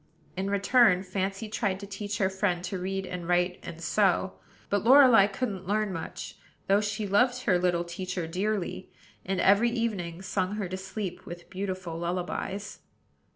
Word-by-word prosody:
In 190 +2 -2
return, 200 -1 +4
Fancy 195 +3 -3
tried 205 -3 -1
to 200 - -7
teach 205 +1 -5
her 190 - +2
friend 190 -2 -1
to 185 +1 -3
read 195 +1 -3
and 180 -2 -6
write 180 0 +1
and 165 - -8
sew; 190 +1 +1 0.3
but 205 -1 0
Lorelei 250 -4 +7
couldn't 195 -3 -4
learn 210 -1 0
much, 165 -2 -6 0.3
though 200 +1 +3
she 210 +1 -2
loved 245 +6 +2
her 180 -3 +3
little 175 -1 +1
teacher 180 0 -4
dearly, 185 +1 -3 0.3
and 190 0 -2
every 205 +6 +5
evening 195 -7 -3
sung 190 +1 -1
her 205 -3 -2
to 185 - -3
sleep 190 -1 -6
with 175 0 -9
beautiful 185 -3 -4
lullabies. 180 +3 -3
190 Hz, 160 wpm, -28 LUFS, 180-205 Hz, 0.3 s, Lorelei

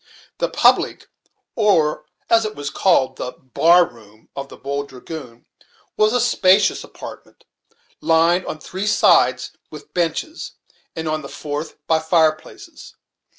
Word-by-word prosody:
The - - 0
public, - - +2 0.5
or 195 -9 +2 0.2
as 225 0 +4
it 215 0 -4
was 145 -1 -5
called, 130 -9 +2
the 125 - -5
"bar 170 +7 +3
room," 110 -4 -18
of 140 0 -6
the - - -12
"Bold 140 +1 -4
Dragoon," 125 -2 -10 0.5
was 215 0 +3
a 245 - +1
spacious 195 -4 +3
apartment, - - -12 0.6
lined 170 +2 +2
on - - -4
three 190 +6 -5
sides 210 - +3 0.2
with - - -12
benches 175 - -3 0.4
and 160 -1 -4
on 155 0 -1
the 140 - -9
fourth 150 +1 -6
by 160 -1 +2
fireplaces. 160 - -1
160 Hz, 135 wpm, -20 LUFS, 140-195 Hz, 0.6 s, as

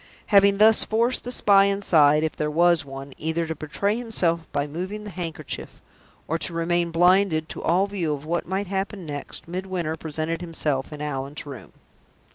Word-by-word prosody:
Having 200 0 +6
thus 215 +1 +6
forced 235 +3 +1
the 245 - -5
spy 200 -4 +5
inside 160 -7 +3
(if 160 - -2
there 150 - -2
was 170 +1 +3
one) 135 0 -9
either 160 +1 -1
to 160 - -3
betray 160 +7 -2
himself 180 -9 -1
by 145 - -1
moving 185 +8 -5
the 210 - -8
handkerchief, 165 -5 -6 0.5
or 165 +1 -1
to 170 - 0
remain 170 +1 0
blinded 175 -1 +3
to - - -6
all 180 +4 +2
view 190 -6 -2
of 145 0 -4
what 170 +2 -2
might 190 +3 -2
happen 195 0 -4
next, 145 +1 -6
Midwinter 180 -2 -3
presented 160 +1 -3
himself 155 -6 -2
in 150 0 -6
Allan's 140 0 -4
room. 140 -4 -10
170 Hz, 175 wpm, -24 LUFS, 155-195 Hz, 0.5 s, Having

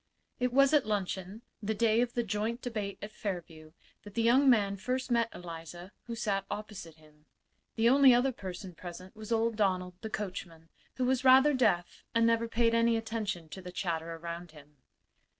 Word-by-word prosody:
It 250 0 +1
was 275 +3 +4
at 285 -7 +4
luncheon, 195 +1 -3 0.2
the 220 +1 -2
day 225 +1 +3
of 245 -1 -1
the 240 - +1
joint 220 +3 -2
debate 210 -5 -4
at 210 - -6
Fairview, 165 -7 -6 0.3
that 205 -1 -13
the 230 - +1
young 260 +4 +5
man 205 -5 +3
first 255 +5 -3
met 235 -1 +2
Eliza, 175 +1 -9
who 235 - -5
sat 205 -4 -1
opposite 200 -6 -7
him. 155 -1 -23 0.5
The 225 0 +3
only 270 +1 +7
other 250 +2 +3
person 190 -5 -8
present 180 +2 -10
was 215 +1 -9
old 225 -1 +1
Donald, 185 -3 0
the 220 - -5
coachman, 175 -6 -6 0.3
who 255 - 0
was 255 0 +1
rather 265 +3 +7
deaf 200 -10 +1
and 230 0 +4
never 230 0 +2
paid 230 0 +2
any 230 0 +3
attention 215 -7 -3
to 190 - -8
the 180 -1 -8
chatter 165 -2 -3
around 170 0 -7
him. 150 -1 -17
210 Hz, 185 wpm, -31 LUFS, 180-235 Hz, 0.5 s, only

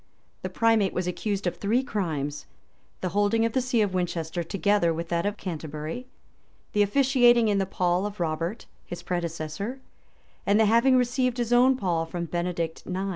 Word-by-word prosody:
The - - -4
primate 225 -4 +2
was 180 - -1
accused 200 +2 -2
of 175 -1 -1
three 230 +6 +1
crimes; 155 - -3 0.5
the 185 - -1
holding 205 +4 +2
of 230 - -1
the 260 - +2
see 245 -3 +2
of 200 -2 -2
Winchester 175 -2 -2
together 175 +1 +1
with 165 +1 -4
that 170 +2 0
of 205 0 -3
Canterbury; 160 - -5 0.7
the 210 - +3
officiating 240 0 +4
in 200 -1 +2
the 195 - 0
pall 180 +1 0
of 205 -1 -9
Robert, 170 +5 -2 0.2
his 175 0 -8
predecessor; 175 +7 -4 0.6
and 205 +2 +3
the 220 - +5
having 235 +5 +4
received 250 0 +1
his 240 -1 0
own 255 +2 +5
pall 170 -6 -1
from 170 +1 -4
Benedict 170 -1 -3
IX. 190 +2 -2
195 Hz, 175 wpm, -26 LUFS, 170-230 Hz, 0.7 s, the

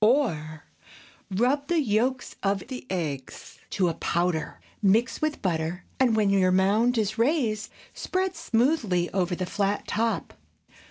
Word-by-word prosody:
Or, 160 - +1 0.7
Rub 255 +9 +1
the 345 -1 +2
yolks 250 0 0
of 195 -1 0
the 255 -1 -7
eggs 150 -8 -5
to 190 -3 +1
a 165 - 0
powder; 170 0 -1 0.2
mix 215 +4 +2
with 310 -1 -1
butter, 170 0 -1 0.2
and 250 -4 +4
when 210 -2 +3
your 185 -2 +3
mound 210 +6 +3
is 215 0 -1
raised, 230 -6 +1 0.2
spread 375 0 -2
smoothly 235 - +1
over 180 -2 0
the 185 - -3
flat 200 +2 -1
top. 225 +2 -1
210 Hz, 140 wpm, -26 LUFS, 185-250 Hz, 0.7 s, and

